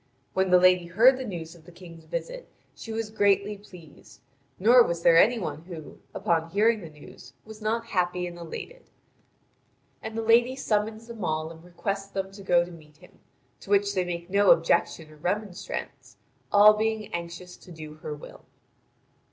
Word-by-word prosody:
When 190 0 +1
the 180 - +7
lady 180 -1 +4
heard 235 +9 +5
the - - -3
news 170 -7 -6
of 165 -2 -18
the 175 - -14
King's 170 -2 -13
visit - - -6 0.2
she 225 - -9
was 220 -1 -4
greatly 205 -1 +2
pleased; 180 -6 -16 0.4
nor 240 +6 +6
was 170 -7 0
there 165 -1 +6
any 235 +6 +4
one 180 -6 -5
who, 165 -4 -10 0.2
upon 165 -1 0
hearing 215 +4 +2
the 165 - -9
news, 150 -1 -15
was 220 0 -12
not 225 +2 -1
happy 180 -4 -1
and 175 -1 -7
elated. 480 - -9 1.1
And 220 0 -6
the 225 - -2
lady 235 +3 +4
summons 220 -3 -1
them 230 -3 -8
all 155 -1 -2
and 165 0 -14
requests 195 +3 -4
them 195 -1 -4
to 200 +1 -12
go 175 -2 +3
to 175 - -12
meet 155 -3 -16
him, - - -20 0.4
to - - -14
which 405 0 +2
they 185 - +1
make 170 -1 -5
no 200 0 +4
objection 165 -1 +2
or 155 - -16
remonstrance, 190 +3 -5 0.3
all 210 +1 +8
being 220 0 -2
anxious 170 +1 -6
to 180 - -16
do 155 -2 -9
her 155 -1 -6
will. 145 - -13
190 Hz, 180 wpm, -26 LUFS, 170-220 Hz, 1.1 s, all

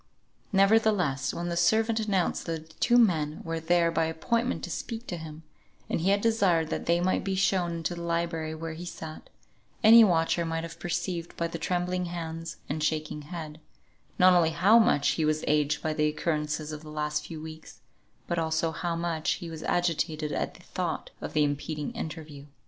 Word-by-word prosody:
Nevertheless, 195 -9 +3
when 175 +1 -4
the 170 - -2
servant 220 +6 +3
announced 200 -6 0
that 160 -1 -5
two 240 - +4
men 160 -10 +3
were 165 0 -3
there 170 +1 +2
by 165 -1 +1
appointment 230 +10 -1
to - - -5
speak 230 0 -5
to 180 - -4
him, 160 0 -9 0.5
and - - 0
he 185 - +2
had 200 +1 +3
desired 195 -8 +2
that - - -3
they 170 0 +3
might 185 +1 +1
be 195 -1 -1
shown 185 -2 +1
into 165 +1 -2
the 170 - -7
library 170 -2 -2
where 165 0 -5
he 165 +2 -8
sat, 160 -3 -8 0.5
any 225 +1 +10
watcher 170 -3 +2
might 165 0 -2
have 165 - -8
perceived 175 -1 -3
by 170 - 0
the 165 0 -6
trembling 180 +1 -1
hands, 165 -1 -5
and 150 +2 -2
shaking 155 -1 -1
head, 155 -1 -7 0.6
not 185 0 +7
only 170 -2 +4
how 195 +8 +5
much 145 -10 +3
he 160 - 0
was 155 0 +1
aged 150 0 +1
by 155 - 0
the 150 0 +2
occurrences 150 0 -2
of 150 -1 -6
the 155 - -11
last 150 0 -2
few 160 -2 -7
weeks, 160 0 -10 0.4
but 170 - -1
also 160 0 0
how 170 +1 -2
much 165 -2 -1
he 170 -1 -7
was 160 -1 -7
agitated 160 -3 0
at - - -2
the - - -16
thought - - -4
of - - -5
the 150 - +3
impending 145 +1 -2
interview. 150 -3 -7
165 Hz, 190 wpm, -28 LUFS, 155-180 Hz, 0.6 s, any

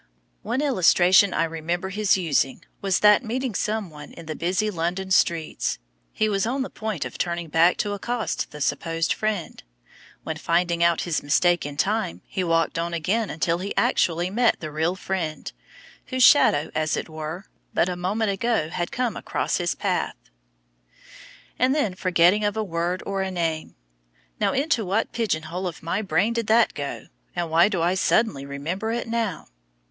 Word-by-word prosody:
One 235 +6 -1
illustration 190 - +5
I - - +1
remember 165 +3 -3
his 200 0 +2
using 145 -7 0 0.2
was, 195 -2 +1
that 210 +4 +6
meeting 250 +1 -2
someone 185 -9 -3
in 170 - -11
the 155 - -4
busy 185 +6 0
London 180 +2 -3
streets, 170 -4 +1 0.3
he 215 - 0
was 205 0 0
on 265 +3 -1
the - - -7
point 215 -11 -3
of 125 - -8
turning 170 -1 -2
back 165 +3 +4
to 205 -1 -1
accost 230 +3 -2
the 150 - -10
supposed 165 +4 0
friend, 215 -5 -3 0.6
when - - -4
finding 170 0 +1
out 170 -1 +3
his 170 -3 -1
mistake 175 +3 +2
in 145 -1 -8
time 190 - -1
he 185 - -3
walked 165 -1 +1
on 170 0 -2
again 200 +7 0
until 165 +2 0
he 200 +2 -4
actually 175 +2 +1
met 235 +3 +2
the 155 -2 -6
real 160 +4 0
friend, 180 -5 -4 0.5
whose 255 -1 +1
shadow, 155 - +5
as 155 0 0
it - - -4
were, 160 +3 -6 0.3
but - - +2
a 180 - -2
moment 200 +4 -1
ago 200 -5 0
had 175 +1 -3
come 245 -2 -1
across - - -2
his 175 -1 -1
path. - - -1 1.4
And 255 +3 +3
then 255 -10 +1
the 180 - -14
forgetting 185 +3 +3
of 205 +1 0
a 220 - 0
word 175 -1 -2
or 195 -1 -2
a 190 - -1
name. 165 -3 -2 0.6
"Now - - +2
into 275 -4 +1
what 200 +4 0
pigeon 210 -9 -1
hole 180 +4 -4
of 170 - -7
my 170 +6 -1
brain 200 +3 +1
did 230 -2 -2
that 225 +1 +4
go, 140 -1 -5 0.3
and 170 -2 -2
why 170 +5 +5
do 185 -6 -1
I 175 +2 +2
suddenly 185 -7 +1
remember 170 +10 -3
it 235 0 -3
now?" 225 -7 -2
180 Hz, 180 wpm, -24 LUFS, 165-215 Hz, 1.4 s, that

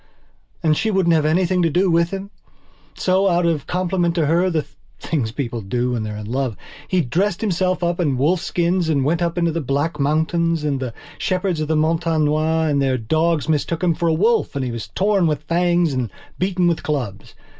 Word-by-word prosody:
And 155 -2 +3
she 220 - 0
wouldn't 190 -5 +2
have 155 -2 +2
anything 180 +3 +2
to 165 - +3
do 180 +4 +2
with 170 0 +3
him. 195 +1 -6 0.6
So, 190 +1 +2
out 175 -1 +2
of 160 -4 0
compliment 180 -1 0
to 165 -3 +2
herthe 165 -1 +1 0.3
things 130 -9 -2
people 120 -2 -4
do 120 +5 -1
when 120 -2 -1
they're 105 -1 -4
in 105 - -7
love!he 130 - -3
dressed 175 +7 -1
himself 185 -3 0
up 175 +1 0
in 145 -7 +1
wolfskins 170 +3 +1
and 140 -4 +1
went 165 +4 +1
up 170 0 -1
into 170 -1 +2
the 165 +1 -2
Black 145 +3 -1
Mountains. 160 +3 +1
And 145 -3 0
the 125 -3 -5 0.2
shepherds 185 -2 -1
of 155 - -2
the 160 - +1
Montagne 160 0 +1
Noire 155 +2 +1
and 145 -2 +1
their 130 -1 +1
dogs 160 +7 0
mistook 160 +2 -1
him 175 -2 +3
for 170 +1 -1
a 165 - +3
wolf 220 0 +1
and 135 -2 -1
he 125 - -3
was 115 -2 -5
torn 195 -2 +1
with 150 -2 -1
the - - -33
fangs 175 -1 +2
and 125 -4 -2 0.3
beaten 185 -1 +1
with 170 -2 +1
clubs. 120 -10 -4
165 Hz, 205 wpm, -20 LUFS, 145-175 Hz, 0.6 s, And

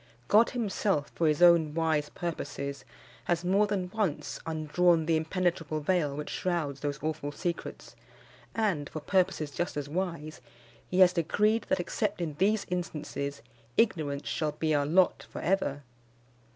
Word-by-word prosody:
God 220 +3 +5
himself, 200 - -1
for 165 - +1
his 150 +3 +3
own 165 -3 +6
wise 160 -3 +1
purposes, 140 -4 -5 0.4
has 175 0 0
more 200 +3 +3
than 190 -3 -2
once 205 -8 -2
undrawn 160 +1 +2
the 165 0 +2
impenetrable 160 -1 -1
veil 150 -2 0
which 150 +1 -5
shrouds 160 -6 -2
those 145 0 -2
awful 155 -2 -2
secrets; 170 +2 -5 0.6
and, 195 -10 0
for 155 - -5
purposes 155 -2 +1
just 175 0 -3
as 145 -1 -3
wise, 165 -2 -4 0.5
he 185 +1 +2
has 180 -1 +7
decreed 210 +6 +1
that, - - +2
except 200 +3 -2
in 165 -4 -2
these 205 +2 +2
instances, 150 -5 -4 0.3
ignorance 150 -10 +1
shall 150 -2 -1
be 155 +1 0
our 145 -1 +2
lot 180 +4 +3
for - - -7
ever. 155 -7 0
165 Hz, 150 wpm, -29 LUFS, 150-185 Hz, 0.6 s, has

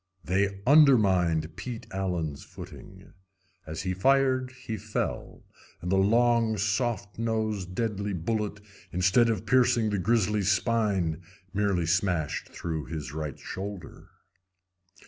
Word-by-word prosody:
They 95 +3 0
undermined 95 - +4
Pete 120 -3 -6
Allen's 90 -7 -2
footing. 95 0 -12 0.5
As 80 +1 -5
he 95 -1 -1
fired 130 +4 +2
he 130 -3 -6
fell, - - -4 0.4
and 90 - -4
the 95 - +3
long, 115 +2 +3
soft 105 0 -1
nosed, 110 -5 -2
deadly 105 -2 -2
bullet, 105 +3 -2 0.3
instead 95 +7 +3
of 110 -2 -1
piercing 120 -3 +3
the 100 - 0
grizzly's 105 -1 +2
spine, 100 -7 +1 0.3
merely 100 -4 +1
smashed 90 -2 0
through 80 -4 -4
his 75 -1 -6
right 75 -3 -4
shoulder. 95 -3 -7
100 Hz, 115 wpm, -28 LUFS, 90-115 Hz, 0.5 s, undermined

